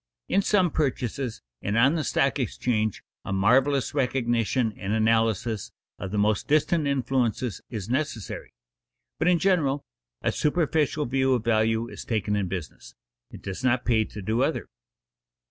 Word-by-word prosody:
In 195 - +3
some 190 -4 +2
purchases, 130 - -2 0.2
and 105 +2 -1
on 130 +6 +5
the 160 -2 0
stock 135 +1 +1
exchange, 110 -3 -1 0.2
a - - -5
marvelous 130 +8 +3
recognition 120 -3 +1
and 100 +1 -3
analysis 110 -1 +1 0.3
of 95 - -4
the 105 - -3
most 105 0 +1
distant 155 +1 +2
influences 125 -5 0
is 110 -6 -5
necessary; 125 -4 -3 0.7
but 160 - +1
in 180 -1 +5
general 160 -7 +1 0.4
a - - +2
superficial 150 -1 +1
view 130 +1 +2
of 120 - -2
value 110 0 +2
is - - -8
taken 105 -2 -1
in 100 -2 0
business; 90 -3 -7 0.3
it - - -12
does 100 +5 -5
not 130 -1 +2
pay 115 -2 +3
to 105 -1 -9
do 110 +5 0
other. 145 +4 -1
120 Hz, 150 wpm, -26 LUFS, 110-140 Hz, 0.7 s, on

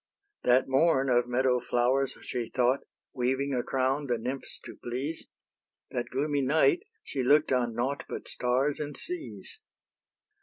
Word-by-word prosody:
That 125 +1 +4
morn 135 -1 +3
of 120 0 +3
meadow 125 0 +2
flowers 125 +3 +1
she 120 -2 -3
thought, 125 +2 +2 0.3
Weaving 135 +2 0
a 125 - +1
crown 135 +3 0
the 120 -2 +1
nymphs 125 +4 -5
to - - -9
please: 135 +7 -4 0.6
That 120 -1 -3
gloomy 145 +2 0
night 155 - +4 0.2
she 135 - -3
look'd 145 +3 +4
on 120 -3 +1
nought 130 +4 -1
But - - -6
stars 130 +4 0
and 150 -1 -4
seas. 355 +4 -6
130 Hz, 145 wpm, -29 LUFS, 125-140 Hz, 0.6 s, That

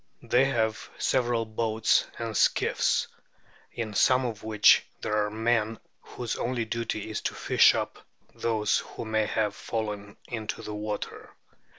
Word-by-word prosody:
They 130 +2 +3
have 110 -5 -1
several 120 -3 +1
boats 110 0 +1
and 115 -2 -4
skiffs, - - +2 0.6
in 110 -3 -4
some 130 +5 +4
of 115 -4 -4
which 110 -1 +5 0.2
there 105 0 +1
are - - -3
men 110 0 0 0.2
whose 120 -3 -5
only 120 -1 -1
duty 110 -2 -3
is - - -3
to - - -3
fish - - +5
up - - -4 0.3
those 110 -3 +1
who - - -8
may 110 -1 +1
have 105 -2 0
fallen 105 -3 -4
into 110 -3 -5
the 105 - -6
water. 105 0 -5
110 Hz, 145 wpm, -27 LUFS, 105-115 Hz, 0.6 s, which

